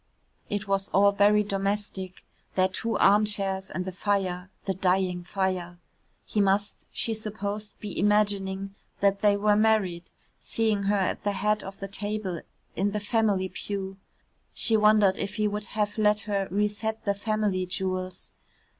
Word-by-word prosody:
It 205 0 -3
was 195 0 0
all 200 +1 +5
very 205 +1 +4
domestic, 195 -2 -2 0.3
their 185 0 +4
two 225 +4 -2
armchairs 195 -2 +3
and 185 - -4
the 190 - -3
fire 185 -2 -1 0.2
the 195 - 0
dying 185 -1 +1
fire. 180 -1 -2 0.5
He 210 - 0
must, 200 +1 0
she 225 - -1
supposed, 210 -1 -5
be 205 -3 -5
imagining 195 -2 +1 0.3
that 200 0 +2
they 205 -1 +4
were 210 0 +3
married, 205 -5 +2 0.3
seeing 220 -3 0
her 205 +1 +2
at 190 - -1
the 205 0 0
head 210 +1 0
of 195 0 -9
the 195 - -5
table, 200 -3 -3 0.3
in 195 +4 +1
the 210 - 0
family 205 -3 +1
pew. 190 0 -5 0.6
She 225 - +2
wondered 210 -2 +5
if 200 +1 -3
he 215 -2 +1
would 210 0 -3
have 210 -1 -2
let 210 0 +3
her 200 -2 -1
re 205 +3 +2
set 220 +1 -4
the 200 - +2
family 205 -3 -1
jewels. 185 0 -3
200 Hz, 155 wpm, -27 LUFS, 190-210 Hz, 0.6 s, all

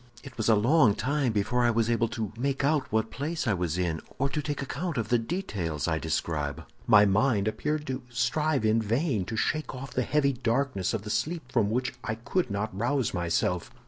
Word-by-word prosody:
"It 135 -2 -11
was 110 -1 0
a 110 - +7
long 120 0 +4
time 140 -2 0
before 110 +4 +1
I 120 - +4
was 115 -1 +2
able 115 0 +2
to 110 -2 -4
make 135 +3 -1
out 140 -1 +1
what 110 0 0
place 155 +4 -3
I 110 - +2
was 90 -3 -1
in, 85 -3 -1 0.2
or 140 +1 +1
to 150 - -2
take 145 -1 -3
account 155 +3 -3
of 110 -2 -2
the 120 - +3
details 100 - -3
I 80 -1 0
describe. 75 -2 -2 0.2
My 105 -2 +7
mind 105 +1 +2
appeared 150 +8 -1
to 130 -2 -3
strive 130 +2 0
in 110 +1 +3
vain 115 - 0
to 110 - -4
shake 155 +5 -1
off 130 +1 -7
the 130 - +1
heavy 140 +2 +2
darkness 120 -5 0
of 105 - -4
the 105 - -5
sleep 155 -2 -2
from 115 -6 +2
which 125 +4 -1
I 110 - -2
could 125 +7 -1
not 100 0 -3
rouse 125 +4 0
myself. 85 0 0
120 Hz, 210 wpm, -28 LUFS, 105-140 Hz, 0.2 s, a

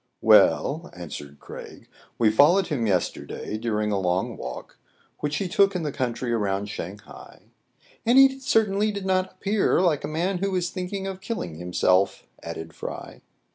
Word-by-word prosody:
" - - -52
Well," 160 +5 +4
answered 75 -4 -8
Craig, - - -11 0.3
"we 110 -2 +4
followed 170 - +5
him 125 -8 0
yes 95 -4 +1
terday 110 - -6
during 105 -2 -1
a 100 - +1
long 90 0 0
walk - - -8 0.4
which 150 0 -2
he 195 - -1
took 195 +2 +3
in 175 - -1
the 150 - -2
country 125 -3 -2
around 100 -2 -1
Shang 95 +1 -6
hai 105 - -14 0.2
" - - -44
— - - -30
"And 240 +3 +5
he 270 0 +6
certainly 215 -4 +2
did 200 -2 -5
not 185 0 0
appear 200 +1 +1
like 170 -5 +2
a - - -2
man 175 +4 -1
who 195 0 -1
is 180 -1 -1
thinking 190 +1 -4
of 190 -1 -5
killing 205 - -4
himself,'* 90 +2 +1 0.2
added 80 -1 -7
Fry. - - -8
150 Hz, 180 wpm, -25 LUFS, -, 0.4 s, he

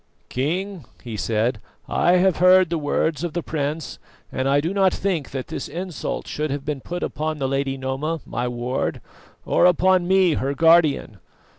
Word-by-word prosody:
"King," 175 +5 -2 0.2
he 115 -3 -6
said, 110 +1 -1 0.3
"I 175 - +2
have 180 -1 +3
heard 185 -1 +5
the 165 - 0
words 150 +1 0
of 170 -3 -3
the 175 - -2
prince, 150 0 -3 0.3
and 130 +1 -1
I 140 +1 +4
do 165 +6 -2
not 195 -2 +3
think 175 -8 -2
that 130 -2 -5
this 160 -4 -4
insult 175 -1 -5
should 150 +1 -3
have 140 0 -4
been 145 -3 -3
put 175 +5 -5
upon 155 0 -3
the 135 -2 -1
Lady 135 0 -1
Noma, 135 +5 -2
my 120 +2 -3
ward, 120 +1 -2 0.5
or 180 - +4
upon 180 0 +3
me, 190 -2 +4
her 140 0 -1
guardian. 160 - +3
155 Hz, 175 wpm, -22 LUFS, 135-175 Hz, 0.5 s, heard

